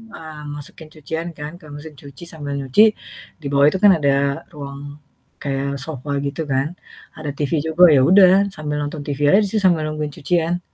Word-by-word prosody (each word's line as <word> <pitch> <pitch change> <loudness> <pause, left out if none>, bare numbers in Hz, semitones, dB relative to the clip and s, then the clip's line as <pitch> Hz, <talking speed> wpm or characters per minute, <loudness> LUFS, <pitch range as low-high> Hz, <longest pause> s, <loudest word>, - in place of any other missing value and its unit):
eee, 155 -1 -10 0.2
masukin 145 +2 -10
cucian 160 +2 -5
kan 150 +1 -6
ke 175 - -17
mesin 150 +2 -10
cuci 140 +3 -12
sambil 145 -3 -6
nyuci, 135 +7 +2 0.6
di - - -14
bawah 140 0 +4
itu 170 - -2
kan 205 - +8
ada 145 -3 +1 0.4
ruang 140 -2 -8 0.6
kayak 135 -1 -2 0.2
sofa 145 -2 -6
gitu 140 +3 -4
kan. 135 +2 +1 0.5
Ada 155 -2 -5
TV 145 -2 -2 0.2
juga, 160 +3 +3
ya 135 - +5
udah 185 -1 +7 0.2
sambil 150 -1 -4
nonton 145 +1 -5
TV 145 -1 -4
aja 195 - +7
sih 220 - 0
sambil 175 -4 +3
nungguin 155 -1 -4
cucian. 170 +3 0
150 Hz, 180 wpm, -20 LUFS, 140-160 Hz, 0.6 s, kan